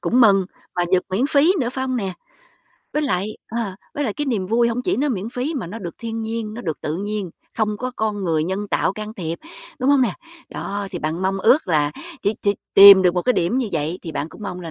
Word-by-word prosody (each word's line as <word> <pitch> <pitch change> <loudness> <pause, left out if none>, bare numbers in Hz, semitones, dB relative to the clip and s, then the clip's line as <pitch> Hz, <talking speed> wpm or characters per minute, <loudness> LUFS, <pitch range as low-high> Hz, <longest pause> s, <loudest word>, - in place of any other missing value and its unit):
cũng 250 - +2
mừng, 200 -5 +6 0.3
mà 175 - +1
dược 185 -1 +4
miễn 210 +9 +1
phí 290 +4 +4
nữa, 240 - 0
phải 260 +1 -3
hông 255 -1 -1
nè? 195 -5 -2 0.8
Với 300 - 0
lại, 215 -6 -1
ờ, 225 -5 -3 0.2
với 290 - -1
lại 220 - -1
cái 295 - -2
niềm 215 -8 -1
vui 235 +4 +3
hông 235 +2 -2
chỉ - - 0
nó 290 +3 +1
miễn 215 -5 -2
phí 250 +6 -3
mà 230 - -3
nó 205 +7 -7
được 175 -6 -6
thiên 225 -1 -4
nhiên, 220 -1 -4
nó 235 - -6
được 160 -9 -4
tự 155 +1 -3
nhiên, 205 -1 -3 0.3
không 215 -1 +1
có 255 +3 -3
con 210 -2 -1
người 160 -3 +1
nhân 195 +4 -3
tạo - - +1
can 215 +1 -7
thiệp, 170 -4 -4 0.4
đúng 265 +1 +2
hông 280 -2 +5
nè? 230 -6 +1 0.4
Đó 200 0 -4
thì - - -4
bạn 160 +4 -3
mong 190 +1 0
ước 240 +5 +3
là 150 -3 +2 0.3
chỉ 205 - +1
chỉ 200 0 +2 0.2
tìm 195 -1 +11
được 180 -1 +3
một 180 - 0
cái 250 - +3
điểm 205 +4 +1
như 250 -4 -1
vậy 160 +2 -1
thì 165 - -6
bạn 150 +1 -3
cũng 210 - -13
mong 180 -3 -5
là 165 -2 -7
210 Hz, 255 wpm, -21 LUFS, 180-240 Hz, 0.8 s, tìm